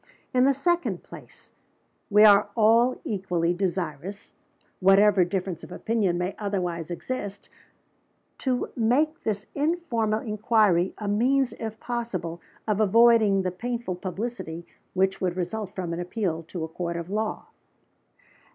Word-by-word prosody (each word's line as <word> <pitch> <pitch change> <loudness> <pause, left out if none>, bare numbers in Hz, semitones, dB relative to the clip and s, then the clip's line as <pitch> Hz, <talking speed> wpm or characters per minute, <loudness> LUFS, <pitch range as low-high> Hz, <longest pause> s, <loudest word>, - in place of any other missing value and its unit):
In 255 0 +4
the 275 - +4
second 345 +5 0
place, - - -14 0.6
we 210 0 +6
are 205 -1 +7
all 230 +3 +4
equally 180 -4 -1
desirous 180 0 -4 0.5
whatever 195 0 +5
difference 180 -1 -3
of - - -10
opinion 210 -6 0
may 180 +2 -2
otherwise 180 -5 -2
exist 200 +2 -5 0.9
to 255 -2 -1
make 280 +8 +1
this 210 -1 -2
informal 280 -9 0
inquiry 210 -4 +2
a 210 - -5
means, 250 +6 +2
if 220 -1 -5
possible, 185 -9 -4 0.3
of 210 -1 +1
avoiding 215 -2 +5
the 185 - -1
painful 235 +1 -3
publicity 180 -2 -5 0.3
which 190 +1 +1
would 180 -1 -1
result 195 +3 -4
from 175 -3 -3
an 170 - -4
appeal 175 -2 -2
to 170 -2 -5
a - - -3
Court 170 +1 -4
of 170 +2 -6
Law." 215 +1 -3
205 Hz, 135 wpm, -26 LUFS, 180-230 Hz, 0.9 s, are